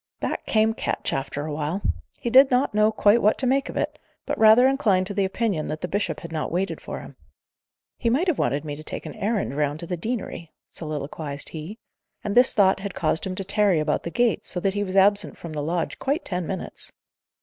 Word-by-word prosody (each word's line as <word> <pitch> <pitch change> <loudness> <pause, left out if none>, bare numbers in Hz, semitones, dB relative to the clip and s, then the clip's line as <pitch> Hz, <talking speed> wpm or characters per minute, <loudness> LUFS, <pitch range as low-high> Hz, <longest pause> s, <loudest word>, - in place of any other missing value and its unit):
Back - - -3
came 220 0 +3
Ketch, - - -2
after 140 +2 -3
a 155 - -4
while. 155 +6 -2 0.4
He 235 - -3
did 265 +2 +8
not 250 -1 +2
know 215 +1 +4
quite 215 +1 +4
what 210 - +3
to 265 - +1
make 270 +2 +1
of - - -6
it, - - -2 0.3
but - - -1
rather 225 +4 +7
inclined 220 -9 +2
to 200 - -3
the 200 0 +1
opinion 190 -5 -1
that 155 0 -4
the 180 - -2
bishop 205 +3 -2
had 170 - -8
not 155 -2 -3
waited 185 +3 -2
for - - -6
him. - - -12 0.8
"He 235 - +1
might 275 +10 +2
have 345 - +1
wanted 140 +5 0
me 145 -1 -4
to 155 - -10
take - - -6
a - - -6
errand 205 - -1
round 145 0 0
to - - -5
the 180 +1 -3
deanery," 210 -4 -4 0.2
soliloquized 150 -2 -5
he. 165 +7 -7 0.5
And 205 - -2
this 245 +3 +5
thought 195 -2 +4
had 195 -1 -6
caused 160 +1 0
him 185 - -4
to 195 - -3
tarry 200 -3 +2
about 150 0 0
the - - -5
gates, 240 +4 +1
so 180 - -2
that 195 +1 +1
he 205 0 -1
was 190 -1 -5
absent 200 +1 +3
from 165 -2 -8
his 150 - -3
lodge 165 +3 -2
quite 285 +6 -1
ten 180 -3 -3
minutes. 190 - -5
195 Hz, 230 wpm, -24 LUFS, 160-220 Hz, 0.8 s, did